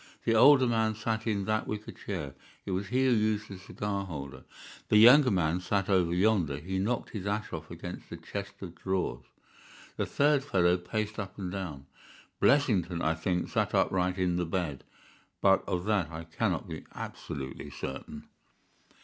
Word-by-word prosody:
The 115 Hz, -, +3 dB
older 130 Hz, +3 st, +7 dB
man 110 Hz, -2 st, +1 dB
sat 110 Hz, +1 st, -2 dB
in 100 Hz, -3 st, 0 dB
that 110 Hz, +1 st, 0 dB
wicker 105 Hz, 0 st, -5 dB
chair; 75 Hz, -9 st, -5 dB, 0.3 s
it -, -, -4 dB
was 95 Hz, +2 st, -2 dB
he 130 Hz, +4 st, +1 dB
who 130 Hz, -, +4 dB
used 110 Hz, -2 st, +1 dB
the 95 Hz, -2 st, -8 dB
cigar 100 Hz, +1 st, -3 dB
holder. 70 Hz, -8 st, -7 dB, 0.4 s
The 105 Hz, -, +5 dB
younger 125 Hz, +5 st, +8 dB
man 90 Hz, -4 st, +1 dB
sat 95 Hz, +2 st, -1 dB
over 90 Hz, -3 st, +3 dB
yonder; 90 Hz, -6 st, +2 dB
he 95 Hz, +5 st, -3 dB
knocked 115 Hz, +6 st, -1 dB
his 100 Hz, -3 st, -5 dB
ash 105 Hz, +2 st, -2 dB
off 80 Hz, 0 st, -6 dB
against 90 Hz, +1 st, -8 dB
the -, -, -7 dB
chest 100 Hz, 0 st, -6 dB
of 90 Hz, -4 st, -7 dB
drawers. 90 Hz, -9 st, -2 dB, 0.7 s
The -, -, -1 dB
third 145 Hz, -1 st, +3 dB
fellow 90 Hz, -8 st, +3 dB
paced 105 Hz, +4 st, -3 dB
up 100 Hz, -2 st, -6 dB
and 95 Hz, -3 st, -4 dB
down. 85 Hz, -8 st, -5 dB, 0.5 s
Blessington, 95 Hz, -, +3 dB
I 80 Hz, -, +2 dB
think, 90 Hz, +2 st, -1 dB
sat -, -, 0 dB
upright 90 Hz, 0 st, +1 dB
in 90 Hz, -2 st, +1 dB
the 90 Hz, -, 0 dB
bed, 85 Hz, -6 st, -2 dB, 0.6 s
but 95 Hz, -1 st, +4 dB
of 90 Hz, 0 st, -1 dB
that 105 Hz, -6 st, +1 dB
I 80 Hz, 0 st, -7 dB
cannot 80 Hz, 0 st, -2 dB
be -, -, -7 dB
absolutely 65 Hz, -1 st, -6 dB
certain. 65 Hz, +1 st, -7 dB
95 Hz, 175 wpm, -30 LUFS, 85-110 Hz, 0.7 s, younger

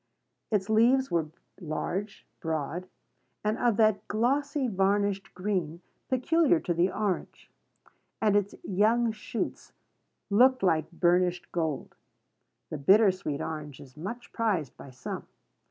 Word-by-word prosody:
Its 200 Hz, -3 st, 0 dB
leaves 240 Hz, +5 st, +4 dB
were 165 Hz, -2 st, +1 dB, 0.3 s
large, 190 Hz, +4 st, -4 dB
broad, 160 Hz, +2 st, -3 dB, 0.6 s
and 215 Hz, +1 st, +2 dB
of 235 Hz, -4 st, +2 dB
that 215 Hz, -2 st, +3 dB
glossy, 275 Hz, +5 st, +1 dB
varnished 200 Hz, -1 st, +1 dB
green 180 Hz, -4 st, -2 dB, 0.3 s
peculiar 260 Hz, -, +3 dB
to 175 Hz, -, -1 dB
the 175 Hz, +3 st, +2 dB
orange; 200 Hz, -2 st, -3 dB, 0.7 s
and 210 Hz, -2 st, +3 dB
its 205 Hz, -1 st, +1 dB
young 225 Hz, +4 st, +2 dB
shoots 225 Hz, +3 st, -5 dB, 0.6 s
looked 255 Hz, +3 st, +5 dB
like 160 Hz, -4 st, +2 dB
burnished 175 Hz, +1 st, +1 dB
gold. 160 Hz, -5 st, -2 dB, 0.8 s
The 155 Hz, -, -4 dB
bitter 195 Hz, +8 st, +6 dB
sweet 170 Hz, -6 st, -4 dB
orange 150 Hz, -3 st, -5 dB
is 130 Hz, -2 st, -14 dB
much 200 Hz, +10 st, -7 dB
prized 195 Hz, -, -1 dB
by 140 Hz, -, -11 dB
some. 125 Hz, -1 st, -7 dB
195 Hz, 120 wpm, -28 LUFS, 170-225 Hz, 0.8 s, bitter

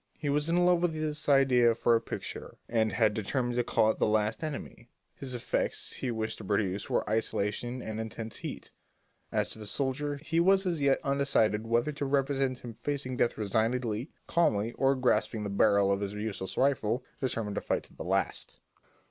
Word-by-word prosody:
He 145 Hz, -, -3 dB
was 150 Hz, +2 st, +1 dB
in 175 Hz, +1 st, +3 dB
love 180 Hz, -1 st, +4 dB
with 175 Hz, -2 st, +1 dB
this 155 Hz, -1 st, -2 dB
idea 125 Hz, -4 st, +5 dB
for 120 Hz, 0 st, +3 dB
a 115 Hz, -, +2 dB
picture -, -, -6 dB
and 110 Hz, -2 st, +1 dB
had 110 Hz, -2 st, +2 dB
determined 120 Hz, +4 st, -1 dB
to 120 Hz, -, +3 dB
call 110 Hz, -2 st, +3 dB
it -, -, -8 dB
"The -, -, +3 dB
Last 110 Hz, +3 st, +1 dB
Enemy." 140 Hz, -5 st, -6 dB, 0.3 s
The 130 Hz, -2 st, -4 dB
effects 120 Hz, -, -2 dB
he 130 Hz, -, -3 dB
wished 110 Hz, -2 st, -3 dB
to -, -, -8 dB
produce 100 Hz, 0 st, -1 dB
were -, -, 0 dB
isolation 110 Hz, +3 st, -1 dB
and 110 Hz, 0 st, -5 dB
intense 110 Hz, 0 st, -6 dB
heat; -, -, -7 dB, 0.6 s
as -, -, 0 dB
to -, -, -4 dB
the 105 Hz, -, -8 dB
soldier, 140 Hz, +5 st, -1 dB
he 165 Hz, +3 st, -1 dB
was 195 Hz, +3 st, +4 dB
as 170 Hz, -5 st, -1 dB
yet 140 Hz, -1 st, +4 dB
undecided 135 Hz, -6 st, +1 dB
whether 120 Hz, +5 st, +2 dB
to 145 Hz, -1 st, -4 dB
represent 135 Hz, -1 st, +1 dB
him 120 Hz, -2 st, -7 dB
facing 135 Hz, +1 st, -3 dB
death 120 Hz, -, +1 dB
resignedly, 110 Hz, +4 st, 0 dB, 0.2 s
calmly, 115 Hz, -10 st, +2 dB
or 135 Hz, +2 st, +2 dB
grasping 110 Hz, -4 st, +1 dB
the 100 Hz, -, -3 dB
barrel 100 Hz, -1 st, +4 dB
of 100 Hz, 0 st, 0 dB
his 100 Hz, 0 st, -3 dB
useless 105 Hz, -3 st, -4 dB
rifle, 125 Hz, -3 st, +1 dB, 0.2 s
determined 115 Hz, -6 st, -2 dB
to -, -, -2 dB
fight -, -, -1 dB
to -, -, -17 dB
the -, -, -6 dB
last. -, -, -2 dB
120 Hz, 190 wpm, -30 LUFS, 110-140 Hz, 0.6 s, idea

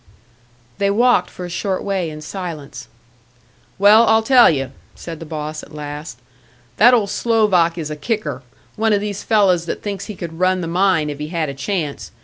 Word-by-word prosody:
They 200 Hz, -, +2 dB
walked 230 Hz, -2 st, +3 dB
for 180 Hz, -, -8 dB
a -, -, -7 dB
short 185 Hz, +2 st, -2 dB
way 195 Hz, -4 st, -1 dB
in 155 Hz, 0 st, -9 dB
silence. 155 Hz, -7 st, -7 dB, 0.9 s
"Well, 210 Hz, +4 st, +6 dB
I'll 220 Hz, 0 st, +4 dB
tell 250 Hz, 0 st, +6 dB
you," 135 Hz, -4 st, -1 dB, 0.2 s
said 165 Hz, -2 st, -8 dB
the 165 Hz, -, -9 dB
boss, 155 Hz, 0 st, -5 dB
at 150 Hz, -, -14 dB
last; 150 Hz, -3 st, -7 dB, 0.6 s
"that 245 Hz, +3 st, +7 dB
old 205 Hz, -4 st, 0 dB
Slovak 205 Hz, -7 st, +2 dB
is 155 Hz, -2 st, -4 dB
a -, -, -3 dB
kicker 150 Hz, -, -3 dB, 0.3 s
one 220 Hz, 0 st, +1 dB
of 205 Hz, -, +3 dB
these 205 Hz, -1 st, -4 dB
fellows 190 Hz, -6 st, +2 dB
that -, -, -4 dB
thinks 200 Hz, -2 st, -4 dB
he 210 Hz, -, -7 dB
could 170 Hz, -2 st, -8 dB
run 185 Hz, 0 st, +2 dB
the 165 Hz, -, -4 dB
mine 170 Hz, -3 st, +1 dB
if 145 Hz, -, -8 dB
he 150 Hz, -, -4 dB
had 160 Hz, -2 st, -2 dB
a -, -, -5 dB
chance. 145 Hz, +1 st, -4 dB
180 Hz, 190 wpm, -19 LUFS, 155-205 Hz, 0.9 s, that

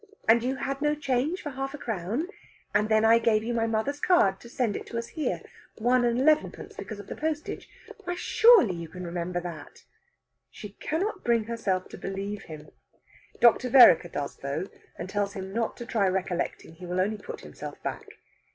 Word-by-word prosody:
And 230 Hz, +1 st, +6 dB
you 255 Hz, +3 st, -1 dB
had 275 Hz, +1 st, -4 dB
no 295 Hz, 0 st, +2 dB
change 290 Hz, +4 st, -1 dB
for 295 Hz, -, -4 dB
half 270 Hz, +1 st, -4 dB
a -, -, -8 dB
crown. 225 Hz, -, -3 dB, 0.5 s
And 210 Hz, +1 st, +2 dB
then 220 Hz, 0 st, +4 dB
I 230 Hz, +1 st, +6 dB
gave 220 Hz, -2 st, +2 dB
you 240 Hz, +2 st, -2 dB
my 230 Hz, -1 st, +1 dB
mother's 225 Hz, +6 st, -1 dB
card 200 Hz, -, +3 dB
to 235 Hz, -, -13 dB
send 235 Hz, -4 st, -1 dB
it -, -, -6 dB
to 230 Hz, -, -5 dB
us 235 Hz, -, -4 dB
here. 315 Hz, -, -3 dB, 0.3 s
One 245 Hz, +2 st, +3 dB
and 235 Hz, 0 st, +1 dB
elevenpence, 305 Hz, +3 st, +1 dB
because 215 Hz, -, -7 dB
of 205 Hz, -, -9 dB
the -, -, -7 dB
postage. 310 Hz, 0 st, -4 dB, 0.4 s
Why, 355 Hz, 0 st, -2 dB
surely 445 Hz, -, +5 dB
you 170 Hz, -2 st, -7 dB
can 180 Hz, +2 st, -8 dB
remember 175 Hz, +1 st, -3 dB
that!" 170 Hz, -4 st, -9 dB, 0.7 s
She 210 Hz, -, -9 dB
cannot 370 Hz, -, -3 dB
bring 235 Hz, -2 st, +2 dB
herself 210 Hz, -5 st, -2 dB
to -, -, -10 dB
believe 195 Hz, +1 st, -5 dB
him. 155 Hz, -2 st, -10 dB, 0.7 s
Dr. 240 Hz, +2 st, +5 dB
Vereker 245 Hz, -9 st, +8 dB
does, 140 Hz, -1 st, -4 dB
though, 140 Hz, +6 st, -3 dB, 0.3 s
and -, -, -5 dB
tells 200 Hz, 0 st, -1 dB
him 190 Hz, 0 st, -6 dB
not 230 Hz, 0 st, -1 dB
to 240 Hz, -, -7 dB
try 220 Hz, -5 st, +1 dB
recollecting; 185 Hz, -3 st, -2 dB
he 180 Hz, +2 st, -10 dB
will 180 Hz, +1 st, -2 dB
only 210 Hz, +4 st, +1 dB
put -, -, -8 dB
himself -, -, -9 dB
back. -, -, -5 dB
225 Hz, 195 wpm, -27 LUFS, 190-265 Hz, 0.7 s, Vereker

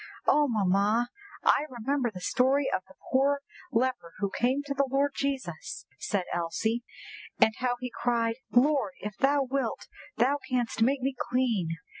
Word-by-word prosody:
_'" -, -, -11 dB, 0.2 s
"Oh, 295 Hz, 0 st, +4 dB
mamma! 210 Hz, +3 st, +2 dB, 0.3 s
I 300 Hz, -, +4 dB
remember 255 Hz, +1 st, -1 dB
the 185 Hz, -4 st, -9 dB
story 265 Hz, +8 st, +2 dB
of -, -, +1 dB
the 190 Hz, -, -17 dB, 0.2 s
poor 280 Hz, +2 st, +3 dB, 0.3 s
leper 245 Hz, -8 st, 0 dB
who 200 Hz, 0 st, -1 dB
came 260 Hz, +6 st, +1 dB
to 285 Hz, -1 st, -3 dB
the 275 Hz, 0 st, +1 dB
Lord 280 Hz, +2 st, +2 dB
Jesus," 270 Hz, -, -3 dB
said 200 Hz, -3 st, -1 dB
Elsie, 220 Hz, +8 st, -1 dB, 0.6 s
"and 220 Hz, -, +5 dB
how 245 Hz, 0 st, 0 dB
he 250 Hz, -1 st, -5 dB
cried, 230 Hz, -1 st, 0 dB
'_Lord 275 Hz, +1 st, +3 dB
if 210 Hz, -1 st, -5 dB
thou 280 Hz, +1 st, +3 dB
wilt, 270 Hz, +1 st, -2 dB, 0.3 s
thou 265 Hz, +5 st, +3 dB
canst 245 Hz, -3 st, -1 dB
make 265 Hz, +4 st, +3 dB
me 270 Hz, +2 st, 0 dB, 0.2 s
clean! 220 Hz, -10 st, +1 dB
250 Hz, 160 wpm, -29 LUFS, 220-275 Hz, 0.6 s, and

